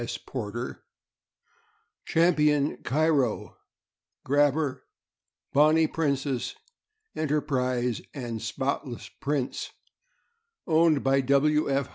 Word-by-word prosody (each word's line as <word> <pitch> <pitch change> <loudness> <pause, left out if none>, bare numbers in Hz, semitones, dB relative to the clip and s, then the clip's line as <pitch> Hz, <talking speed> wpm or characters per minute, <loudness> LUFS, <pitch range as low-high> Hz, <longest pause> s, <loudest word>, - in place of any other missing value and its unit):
S. 120 0 -4
Porter; 120 -1 -6 1.2
Champion 150 -4 +2
Cairo, 140 -4 0 0.7
Grab 145 +1 +3
ber, 150 -5 -2 0.7
Bonnie 155 +3 +5
Princess, 140 - -1 0.6
Enterprise, 130 -6 0
and 120 -5 -5
Spotless 130 +1 -3
Prince, 140 -2 -2 1.0
owned 160 -3 +3
by 135 0 +3
W. 140 +3 +2
140 Hz, 75 wpm, -27 LUFS, 125-150 Hz, 1.2 s, Bonnie